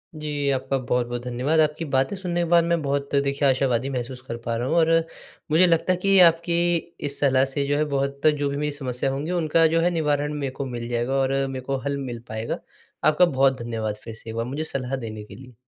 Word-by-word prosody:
जी, 150 -2 -2
आपका 135 0 -1
बहुत-बहुत 120 -1 -1
धन्यवाद। 125 +6 0
आपकी 155 +1 +1
बातें 135 +8 +2
सुनने 180 -2 -2
के - - +1
बाद 170 0 +5
मैं 170 0 0
बहुत 140 0 -2
देखिए 140 +1 +1
आशावादी 130 -1 +1
महसूस 125 -1 -4
कर 115 - -4
पा 115 - -1
रहा 120 +2 -2
हूँ 160 - 0
और 165 -1 +4 0.6
मुझे 165 +4 +6
लगता 170 +2 +2
है - - -2
कि 195 0 +4
आपकी 170 +1 -2 0.5
इस 140 - -1
सलाह 135 -2 +3
से 135 +1 -1
जो 145 0 +1
है 150 - +2
बहुत, 140 0 -1
जो 145 -2 +2
भी 140 - -3
मेरी 150 0 -1
समस्या 135 -2 -2
होंगी 145 +5 -3
उनका 165 -2 +3
जो 165 - +3
है 175 - +3
निवारण 150 -3 0
मेरे 135 -2 -2
को 135 +1 -5
मिल 120 -2 -5
जाएगा 120 +2 -1
और 135 -1 +1 0.2
मेरे 130 -1 -6
को 135 - -1
हल 140 0 -1
मिल 125 -4 -5
पाएगा। 110 +1 -4 0.5
आपका 155 +4 +5
बहुत 135 -4 +2
धन्यवाद 110 -3 -3
फिर 115 - -7
से 115 0 -9
एक 110 - -6
बार, 115 0 -1
मुझे 140 +5 -3
सलाह 135 -4 -3
देने 110 -4 -6
के 105 - -12
लिए। 125 -1 -13
140 Hz, 235 wpm, -24 LUFS, 125-155 Hz, 0.6 s, मुझे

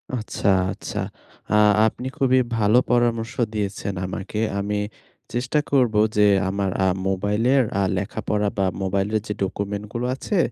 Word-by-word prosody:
আচ্ছা, 110 -3 -3 0.3
আচ্ছা। - - -6 0.5
আ - - +3 0.3
আপনি 125 +3 -4
খুবই 130 -1 +3 0.2
ভালো 110 +2 +4
পরামর্শ 115 -2 +1 0.2
দিয়েছেন 100 -1 -3
আমাকে। 100 +3 -5 0.2
আমি 105 +1 -1 0.5
চেষ্টা 125 +5 0
করব 125 -6 +3 0.2
যে 105 - +6 0.2
আমার 100 0 -1 0.2
আ - - +4 0.2
মোবাইলের 105 +8 +2 0.2
আ - - +3
লেখাপড়া 105 +1 -1
বা 100 - +2 0.2
মোবাইলের 100 +3 0
যে 105 - -2
ডকুমেন্টস 100 +2 -3
গুলো 120 +1 -2
আছে 195 +8 -2
105 Hz, 135 wpm, -23 LUFS, 100-120 Hz, 0.5 s, যে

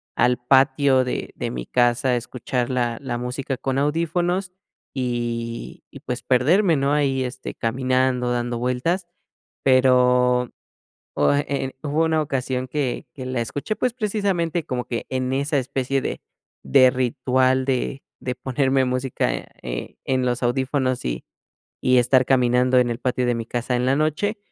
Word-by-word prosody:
al 125 0 +2
patio 135 0 +4
de 125 - -4
de - - -3
mi 60 -1 -5
casa 120 +1 +2
a 125 - +3
escuchar 120 +1 -3
la 120 -2 0
la 120 -4 -4
música 130 +2 -3
con 135 +1 -2
audífonos, 175 +5 0 0.4
y 120 -2 -3
y - - -11
pues 125 0 -5
perderme, 160 +9 +3
¿no?, 140 0 +1
ahí, 140 -3 +1
este, 130 +1 -6
caminando, 130 +1 0
dando 120 0 -1
vueltas. 125 +10 -1 0.6
Pero, 125 -1 +4 0.6
o 75 - +3
eh 145 - +1
eh, 135 -2 -2
hubo 155 +2 +1
una 160 -1 +2
ocasión 130 -2 -2
que 135 -3 -2
que 130 -2 -8
la 130 -2 -2
escuché, 145 - -3
pues, 250 +2 0
precisamente 195 -8 -1
como 125 -2 -3
que 120 - -4
en 130 0 -2
esa 140 +2 0
especie 135 +1 -1
de - - -4 0.4
de 125 - +5
ritual 130 0 +1
de 135 +1 -2 0.2
de 125 -1 -2
ponerme 130 +1 +1
música, 125 0 -1 0.3
eh, - - -5
en 130 -1 0
los 125 0 -1
audífonos 130 - 0
y - - -3 0.6
y 125 0 +4
estar 125 +1 +4
caminando 125 0 +3
en 125 -1 +2
el 120 0 -3
patio 125 -1 0
de 120 - +2
mi 115 -1 -4
casa 120 +2 -2
en 125 - 0
la 130 +1 +3
noche. 155 +8 0
130 Hz, 160 wpm, -23 LUFS, 125-140 Hz, 0.6 s, de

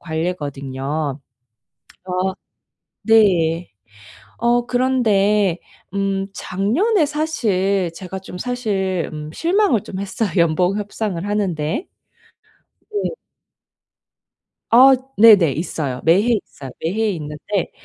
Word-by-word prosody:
관례거든요. 145 -3 -3 0.8
그래서 185 0 -2 0.7
네. 180 -7 +3 0.7
어 240 0 +2
그런데 210 -7 +2 0.4
음 195 -1 -1
작년에 295 - +1
사실 200 - 0
제가 190 +1 -7
좀 190 -1 -10
사실 195 -7 -2
음 150 0 -7
실망을 340 - +2
좀 190 - -7
했어요 200 +2 -2
연봉 175 +3 +2
협상을 205 -3 -4
하는 205 -3 0
데. 155 - -3 1.0
네. 415 -1 -2 1.6
아 260 +3 +8 0.2
네네. 205 -9 +7
있어요. 145 -4 -3
매해 205 +9 +4
있어요. 135 -2 -11
매해 210 +7 0
있는데 160 +3 -4
195 Hz, 190 characters per minute, -20 LUFS, 165-225 Hz, 1.6 s, 아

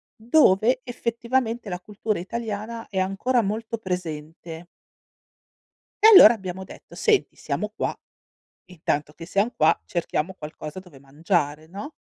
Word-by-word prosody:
dove 240 -1 +3
effettivamente 235 -1 -2
la 180 -1 -4
cultura 210 +2 -3
italiana 225 +3 -5
è 190 - -2
ancora 195 +7 +1
molto 220 +2 -3
presente. 165 -3 -6 1.4
E - - +11
allora 240 - +10
abbiamo 190 -3 -6
detto: - - -14
"Senti, 430 -2 +1
siamo - - -3
qua. - - -3 0.7
Intanto 150 -4 -3
che 165 - -10
siam 200 +6 0
qua 155 - +3
cerchiamo 170 - -2
qualcosa 150 0 -8
dove 180 -8 -13
mangiare", 150 +1 -2
no? 205 - -8
195 Hz, 125 wpm, -24 LUFS, 165-230 Hz, 1.4 s, E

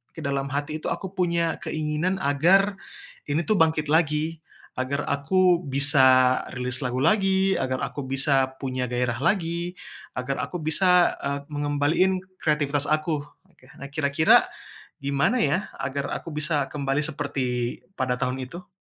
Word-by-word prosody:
ke - - -8
dalam 140 0 -1
hati 145 +2 -3
itu - - -5
aku 190 -2 -4
punya 170 -2 0
keinginan 155 +4 -1
agar, 175 +8 +4 0.6
ini 150 +4 0
tuh 215 - +1
bangkit 160 -2 +2
lagi, 155 0 +1 0.4
agar 140 +3 -1
aku 175 +4 +3
bisa 130 -2 +4 0.2
rilis 125 0 -2
lagu 125 0 -2
lagi, 195 0 +3
agar 130 -1 -2
aku 145 - -4
bisa 135 0 +2
punya 130 -2 -2
gairah 125 0 -1
lagi, 170 -1 0 0.4
agar 130 +2 -3
aku 180 - -5
bisa, 180 +3 +3
e - - -3 0.2
mengembaliin 145 +6 +1 0.2
kreatifitas 145 -2 0
aku. 155 0 0 0.3
Oke, 130 - -23
nah, 140 - -7
kira-kira, 145 +1 +4 0.6
gimana 140 - +1
ya, 195 0 0
agar 140 +1 -3
aku - - -7
bisa 150 -2 0
kembali 140 0 -1
seperti, 135 -5 -2 0.2
pada 130 -5 -1
tahun 130 0 -2
itu? 170 +8 -9
145 Hz, 140 wpm, -25 LUFS, 135-170 Hz, 0.6 s, agar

